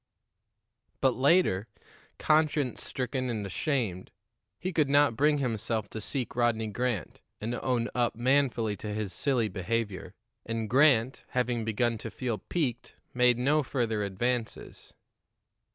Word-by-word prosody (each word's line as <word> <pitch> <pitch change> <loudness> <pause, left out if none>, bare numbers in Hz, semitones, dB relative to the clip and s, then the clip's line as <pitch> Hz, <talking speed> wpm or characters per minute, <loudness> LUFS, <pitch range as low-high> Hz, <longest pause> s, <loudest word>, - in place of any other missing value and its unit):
But 130 -2 +3
later, 130 - +3 0.5
conscience 155 -4 +1
stricken 130 0 -3
and 110 -4 -2
ashamed, 100 - -2 0.5
he 185 - -4
could 155 -3 +2
not 145 -4 +4
bring 150 +4 +3
himself 110 -4 -2
to 110 - -5
seek 125 +3 -4
Rodney 115 -2 +1
Grant 115 -5 -3 0.2
and 115 +3 -3
own 120 -1 0
up 120 -2 +1
manfully 120 -3 +1
to 105 +2 -5
his 105 -3 -3
silly 125 0 +1
behavior. 100 -1 -3 0.3
And 115 -1 -3
Grant, 130 0 +3
having 120 -2 0
begun 115 +1 0
to 115 - -6
feel 120 -2 -3
piqued, 130 -9 -3 0.2
made 125 -1 +4
no 145 +5 +3
further 120 -6 -1
advances. 115 +4 -3
120 Hz, 130 wpm, -29 LUFS, 110-135 Hz, 0.5 s, not